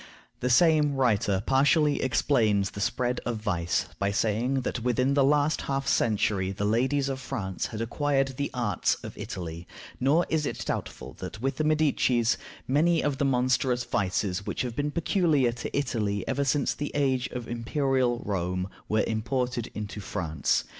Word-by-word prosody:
The 125 - -1
same 150 +1 +4
writer 105 -6 +1
partially 145 +2 +3
explains 110 -6 +2
the 100 - -6
spread 125 +3 0
of 120 -2 -2
vice 90 -6 -1
by 100 +1 +1
saying 115 +5 0
that 125 - -3
within 125 +3 +1
the 140 -1 +4
last 145 +2 +2
half 135 0 -1
century 100 -4 +1
the 100 +1 -3
ladies 130 +6 +1
of 135 -1 -3
France 110 -8 -3
had 110 - -6
acquired 135 +3 0
the 140 +2 -3
arts 120 -4 0
of - - -7
Italy; 85 -1 -6 0.3
nor 145 +7 +3
is 155 -2 0
it - - -4
doubtful - - -4
that 105 - -7
with 135 +3 -2
the 155 - 0
Medicis 140 -6 +2 0.3
many 160 +5 +3
of 140 -2 -1
the 140 - +2
monstrous 125 -1 +1
vices 95 -2 -1
which - - -3
have 120 -2 -4
been 145 +3 -1
peculiar 160 - +2
to 120 +3 -5
Italy 105 -7 -1
ever 140 - 0
since 140 0 +1
the 145 - -4
age 135 -3 +1
of 120 -2 -6
Imperial 125 +1 0
Rome 90 -1 -2 0.2
were 110 0 +2
imported 125 +2 -2
into 105 0 -5
France. 85 -7 -1
125 Hz, 165 wpm, -27 LUFS, 105-140 Hz, 0.3 s, same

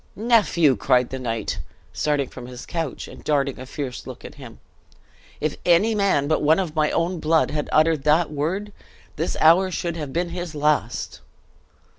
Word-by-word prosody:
"Nephew!" 205 - +3
cried 125 +4 +2
the 130 - -4
knight, 115 -4 -3 0.3
starting 145 -3 0
from 120 - -10
his 125 0 -9
couch; 165 -5 -4
and - - -12
darting 140 -3 0
a 130 - -8
fierce 135 -3 -6
look - - -9
at - - -9
him, - - -12 0.8
"if 155 -1 -2
any 180 +6 +4
man 200 -9 +2
but 155 - +1
one 155 +2 +4
of 175 -5 -2
my 155 -1 +2
own 170 +1 -1
blood 160 +1 +2
had 150 -1 -3
uttered 155 -2 +3
that 155 +2 +3
word, 185 +8 -3 0.4
this 165 +4 -2
hour 170 +4 +5
should 170 -2 -3
have 150 -4 -5
been 175 +4 -1
his 175 -2 -5
last." 150 0 -1
155 Hz, 175 wpm, -23 LUFS, 145-175 Hz, 0.8 s, hour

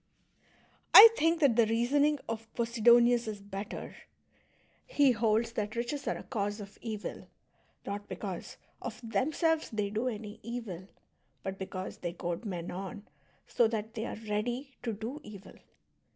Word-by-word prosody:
I 445 +3 +14
think 330 -1 +2
that 275 -6 +5
the 230 -2 +5
reasoning 280 +7 +2
of 225 0 -5
Posidonius 235 0 +4
is 210 -2 -4
better: 200 +1 -7 0.9
he 285 - +4
holds 225 0 +1
that 215 -1 -3
riches 245 +5 -3
are - - 0
a - - -9
cause 205 -3 -3
of 200 0 -10
evil, 220 -3 -6 0.6
not 205 +1 -5
because, 190 -4 -6 0.2
of 240 -1 -6
themselves, 310 - +1
they 210 -2 -2
do 220 +4 -1
any 210 -3 -5
evil, 215 -6 -6 0.6
but 190 0 -5
because 190 -1 -5
they 175 -1 -4
goad 175 +4 -4
men 175 -4 -4
on 195 +3 -7 0.4
so 235 - +3
that 220 0 -4
they 225 -1 -3
are - - -5
I'eady 235 +5 -3
to 235 - -2
do 225 +8 -6
evil. 200 -2 -11
225 Hz, 150 wpm, -31 LUFS, 205-240 Hz, 0.9 s, I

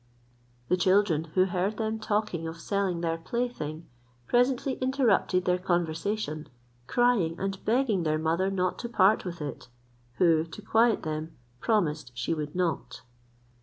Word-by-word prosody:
The 180 - +2
children, 185 -3 +3
who 185 0 +5
heard 190 +3 -1
them 220 0 -2
talking 210 -6 -1
of 165 +1 -7
selling 190 -2 -1
their 165 -1 -1
plaything, 165 -6 -3 0.4
presently 250 - +1
interrupted 250 -8 +2
their 180 0 +2
conversation, 175 -1 -2 0.4
crying 240 - +2
and 195 0 -3
begging 230 -4 +2
their 155 -2 +1
mother 165 +4 +1
not 185 -2 -1
to 235 - -4
part 205 -2 +4
with 170 -3 -5
it, 145 -3 -6 0.5
who, 165 -3 +4
to 165 +5 -10
quiet 225 +1 +3
them, 155 +1 -4 0.2
promised 155 - 0
she 120 +7 -1
would 150 -1 -4
not. 175 -4 -2
185 Hz, 140 wpm, -28 LUFS, 160-215 Hz, 0.5 s, who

